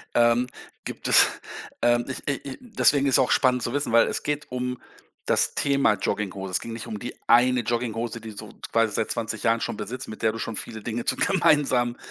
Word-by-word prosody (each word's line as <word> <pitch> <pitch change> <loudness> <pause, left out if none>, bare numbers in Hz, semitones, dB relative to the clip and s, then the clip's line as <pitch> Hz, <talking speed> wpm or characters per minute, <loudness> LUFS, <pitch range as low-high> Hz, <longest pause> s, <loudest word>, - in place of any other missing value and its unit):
Ähm, 120 +1 +4 0.4
gibt - - -5
es, - - +7 0.6
ähm 120 0 +3
ich 130 - -6
i 140 - +1 0.2
i - - -12
deswegen 150 - +2
ist 135 - +4
auch 130 - +2
spannend 125 -2 +3
zu 120 - -2
wissen, 145 -4 -1
weil 115 0 +5
es - - -3
geht 150 -2 -3
um 125 0 -3 0.4
das - - +2
Thema 140 -5 +3
Jogginghose. 95 -1 -3
Es 90 - +1
ging 115 - -7
nicht 115 -2 -7
um 105 - -5
die 120 - -6
1 125 +1 +5
Jogginghose, 115 -1 -3
die 110 -1 -9
du 105 0 -9 0.2
quasi 115 -2 +2
seit 110 - -1
20 110 -1 -3
Jahren 115 0 +3
schon - - -2
besitzt, 120 +6 -6
mit 110 - -9
der 110 - +3
du 115 - -7
schon 115 0 -4
viele 110 +1 -6
Dinge 115 +2 -4
zu - - 0
gemeinsam 135 -10 +2
120 Hz, 215 wpm, -25 LUFS, 110-125 Hz, 0.6 s, es